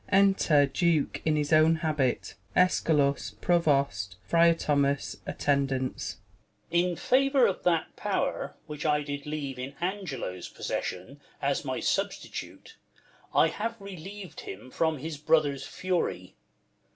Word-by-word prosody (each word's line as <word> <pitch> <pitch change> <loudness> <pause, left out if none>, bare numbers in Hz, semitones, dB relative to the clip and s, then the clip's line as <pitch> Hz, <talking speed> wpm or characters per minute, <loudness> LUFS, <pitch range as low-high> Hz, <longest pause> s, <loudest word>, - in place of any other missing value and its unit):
Enter 195 -7 +5
Duke 160 +1 +1
in 155 -1 +3
his 150 0 -1
oivn 155 0 +5
habit, 150 -6 0 0.2
Eschalus, 140 - +2
Provost, 140 - +1
Frtar 170 0 +5
Thomas, 140 -2 0
Attendants. 135 -2 0
Duke. - - -24 0.6
In 180 -1 -1
favour 270 - +3
of 190 - 0
that 170 -2 +1
pow'r, - - -2
Avhich 150 -1 -6
I 150 -1 +2
did 145 0 -5
leave 145 -4 -4
In 135 +2 -6
Angelo's 170 - -4
possession, - - -4 0.2
as - - 0
my - - -2
substitute, - - -3 0.6
I - - +5
have 230 +2 -3
reliev'd 195 -1 -9
him 105 +7 -9
from 160 -1 +1
his 155 +2 -5
brother's 150 -3 +2
fury. 185 -2 -2
155 Hz, 125 wpm, -28 LUFS, 140-175 Hz, 0.6 s, Enter